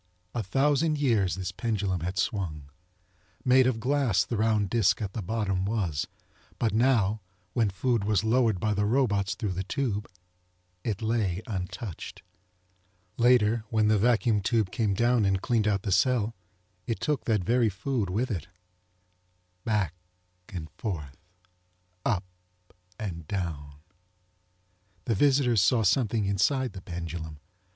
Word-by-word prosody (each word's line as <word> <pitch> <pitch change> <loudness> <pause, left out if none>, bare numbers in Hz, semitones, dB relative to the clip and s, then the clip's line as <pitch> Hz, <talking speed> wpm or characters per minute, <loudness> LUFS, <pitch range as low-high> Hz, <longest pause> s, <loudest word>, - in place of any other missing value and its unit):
A 120 - -1
thousand 145 - +2
years 115 -10 +2
this 95 -1 -4
pendulum 105 -6 -1
had 90 +3 -4
swung. 80 -8 -2 0.7
Made 130 0 +5
of 120 -3 0
glass 125 -6 +2
the 120 - -3
round 110 -1 +2
disk 115 -5 +3
at 100 -3 -4
the 110 - -3
bottom 100 -2 -1
was, 95 -8 -1 0.5
but 115 -4 0
now 110 -3 +2 0.3
when 115 -4 +2
food 115 +3 0
was 105 -2 +1
lowered 110 -3 +2
by 110 +2 +1
the 105 0 +1
robots 105 -6 +1
through 105 - -2
the 90 +1 -2
tube 105 -2 -2 0.8
it 110 -1 -3
lay 110 -4 0
untouched. 95 - -6 0.9
Later, 120 -2 +4
when 110 -1 +2
the 110 -1 +4
vacuum 115 -1 +3
tube 105 -1 +1
came 105 -4 0
down 120 +1 +3
and 95 -1 +2
cleaned 115 -3 +1
out 100 -2 +1
the 100 - -2
cell 115 +2 +2 0.5
it 115 - -2
took 150 -3 -1
that 110 -5 +1
very 120 +2 +3
food 105 +1 -2
with 115 +7 -1
it. 95 -2 -3 1.2
Back 105 -8 +1 0.6
and 85 -4 -6
forth—up 90 - -6 0.7
and 85 -7 -6
down. 80 -7 -4 1.3
The 115 - +1
visitors 125 -2 +3
saw 110 +5 +3
something 110 +1 +2
inside 125 +7 +1
the 95 - -8
pendulum. 85 -3 -6
105 Hz, 135 wpm, -28 LUFS, 95-120 Hz, 1.3 s, Made